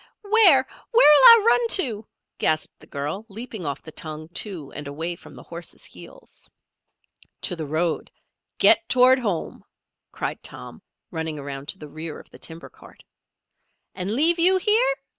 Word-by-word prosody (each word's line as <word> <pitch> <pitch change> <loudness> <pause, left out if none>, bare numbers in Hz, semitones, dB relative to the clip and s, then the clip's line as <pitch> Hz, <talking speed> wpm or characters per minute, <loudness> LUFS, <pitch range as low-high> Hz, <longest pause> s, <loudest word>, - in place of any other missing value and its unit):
"Where, 400 -11 +5 0.2
where'll 455 -8 +6
I 465 -2 +8
run 470 0 +3
to?" 225 - -4 0.3
gasped 155 0 -1
the - - -17
girl, 150 +9 -5
leaping 220 -4 -7
off 140 0 -5
the 160 - -10
tongue, 155 0 -8
too, 175 -5 -5
and 145 -1 -7
away 160 +5 -4
from - - -16
the - - -12
horses' 170 0 -10
heels. - - -13 0.9
"To 180 - -2
the 160 -3 -6
road. 160 +3 -2 0.5
Get 340 - +4
toward 255 +1 +5
home!" 200 -9 -4 0.5
cried - - -5
Tom, 60 - -8 0.3
running 160 -1 -4
around 140 0 -7
to 190 - -4
the 150 - -10
rear 155 +1 -7
of - - -17
the - - -15
timber 165 0 -11
cart. - - -18 0.9
"And 185 0 -4
leave 320 +10 +2
you 370 +3 +5
here?" 450 +6 +2
185 Hz, 160 wpm, -23 LUFS, -, 0.9 s, I